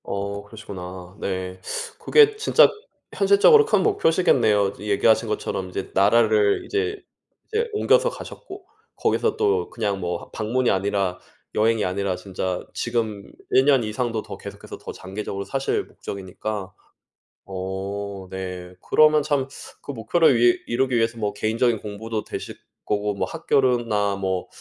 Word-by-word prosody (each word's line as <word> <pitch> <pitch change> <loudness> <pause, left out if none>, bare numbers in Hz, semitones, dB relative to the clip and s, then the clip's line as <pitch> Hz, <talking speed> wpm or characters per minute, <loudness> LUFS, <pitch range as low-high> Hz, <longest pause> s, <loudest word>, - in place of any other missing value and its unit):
어 100 +1 -4
그러시구나. 95 -3 -9
네. 95 -1 -4 0.4
그게 440 -1 +5
진짜 430 - +5 0.5
현실적으로 200 - +6
큰 - - +2
목표시겠네요. 135 - +3
이 105 - -6
얘기하신 110 +3 +3
것처럼 95 -3 -3
이제 - - -5
나라를 105 0 +3
이제 415 0 -1 0.5
이제 465 +1 -1
옮겨서 - - +3
가셨고 385 -5 -10 0.3
거기서 455 -2 +1
또 435 0 +1
그냥 105 -4 -2
뭐 90 -1 -2
하 - - -14
방문이 120 +3 0
아니라 95 -1 0 0.3
여행이 110 0 +2
아니라 95 0 -1
진짜 95 -1 -4
지금 110 -4 -3 0.2
1 130 - +5
년 135 -4 +4
이상도 110 +1 -2
더 - - -8
계속해서 - - -9
더 - - -7
장기적으로 100 +1 -6
사실 135 0 -1
목적이니까 100 +1 -6 0.7
어 95 +1 -5
네 90 -1 -6
그러면 155 0 +5
참 140 -3 0 0.4
그 - - -5
목표를 135 +5 +3
위 120 0 +4
이루기 130 +1 +1
위해서 115 0 +1
뭐 105 -1 -1
개인적인 110 +2 +1
공부도 110 +1 -5
되실 - - -7 0.3
거고 105 -1 -1
학교로나 120 -10 +1
뭐 95 -2 -2
105 Hz, 305 characters per minute, -23 LUFS, 100-130 Hz, 0.7 s, 현실적으로